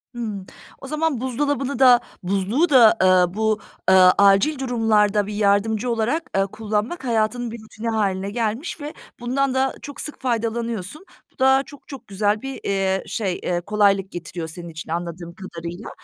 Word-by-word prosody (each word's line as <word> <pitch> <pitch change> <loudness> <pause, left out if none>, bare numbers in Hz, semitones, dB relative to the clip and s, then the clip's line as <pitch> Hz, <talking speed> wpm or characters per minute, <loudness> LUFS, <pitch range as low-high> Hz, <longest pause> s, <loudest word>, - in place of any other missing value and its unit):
Imm, 215 -5 -5 0.4
o 270 - -8
zaman 305 -3 -1
buzdolabını 270 +1 -1
da, 250 -2 +7 0.2
buzluğu 200 - +1
da, 240 -6 +7
eee, 185 -1 +4
bu, 215 +1 0 0.3
eee, - - +7 0.2
acil 200 +9 +4
durumlarda 215 -5 +2
bir 210 - -5
yardımcı 210 +3 +1
olarak, 235 +8 0
ııı, 195 - +2
kullanmak 215 - -3
hayatının 230 +1 0
bir 230 -1 -8
rutini 220 +1 -6
hâline 200 -3 -1
gelmiş 235 - -3
ve 295 +2 -6 0.3
bundan 260 +2 0
da 265 0 0
çok 285 - -7
sık 300 - -5
faydalanıyorsun. 235 - -3 0.3
Bu - - -35
da 265 +1 +4
çok 285 -2 -15
çok 275 -3 -10
güzel 205 +2 0
bir, 270 0 -6
eee, 195 -1 0
şey, 195 -5 -2
eee, 175 -1 -1
kolaylık 200 0 +2
getiriyor 170 -1 -6
senin 170 +2 -8
için 160 -1 -9
anladığım 170 0 -5
kadarıyla. 175 +2 -8
220 Hz, 160 wpm, -22 LUFS, 195-260 Hz, 0.4 s, da